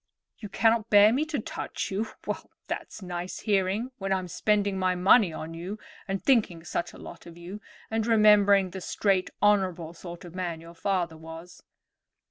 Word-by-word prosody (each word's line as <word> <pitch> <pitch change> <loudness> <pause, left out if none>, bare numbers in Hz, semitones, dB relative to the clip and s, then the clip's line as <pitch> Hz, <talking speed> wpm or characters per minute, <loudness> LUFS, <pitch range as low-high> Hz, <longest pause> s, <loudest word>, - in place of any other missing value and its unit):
"You 210 - -7
cannot 225 +2 +2
bear 205 +1 +7
me 285 +5 +1
to 310 -2 -3
touch 215 - -5
you! 210 +4 -1 0.2
Well, - - -4 0.2
that's 205 - -6
nice 180 0 -5
hearing 205 +4 0
when 195 0 -3
I'm 185 -1 0
spending 200 +1 0
my 185 -1 +1
money 190 +1 +5
on 160 +1 -7
you 180 +6 -6 0.3
and 195 -1 -3
thinking 205 -11 +2
such 170 - -3
a - - -12
lot - - -11
of 170 0 -12
you, 180 +5 -8 0.3
and 225 0 0
remembering 205 -4 +5
the 190 - -7
straight 190 0 0
honorable 185 -5 +2
sort 175 0 -10
of 170 - -11
man 175 -3 -3
your 165 +1 -12
father 175 -2 -1
was." 165 +2 -11
190 Hz, 175 wpm, -27 LUFS, 175-210 Hz, 0.3 s, bear